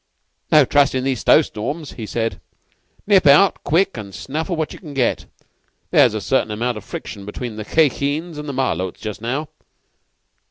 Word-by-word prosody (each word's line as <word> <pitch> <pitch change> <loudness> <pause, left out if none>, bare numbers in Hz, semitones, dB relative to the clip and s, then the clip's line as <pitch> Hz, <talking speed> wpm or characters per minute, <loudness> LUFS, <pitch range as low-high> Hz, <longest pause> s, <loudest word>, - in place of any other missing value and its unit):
"'No 150 -3 +7
trustin' 135 -2 +2
these 130 -3 -1
snow 155 - +5
storms,' 145 +7 -5
he 110 -3 -7
said. 115 -4 -3 0.6
'Nip 195 -6 +4
out 150 +8 +5
quick 170 -1 +1
and 100 -4 -8
snaffle 155 - -3
what 160 -1 -3
you - - -11
can 150 -6 -10
get. 130 -3 0 0.6
There's - - +5
a - - -2
certain - - +1
amount 115 +2 -2
of 105 - -8
friction 100 -2 -7
between 110 +3 -6
the 110 -1 -6
Khye 155 +5 +4
Kheens 150 +5 -3
and 150 0 -6
the - - -4
Malôts 95 -9 -1
just 105 -1 -6
now. 135 +6 -3
135 Hz, 175 wpm, -20 LUFS, 110-155 Hz, 0.6 s, No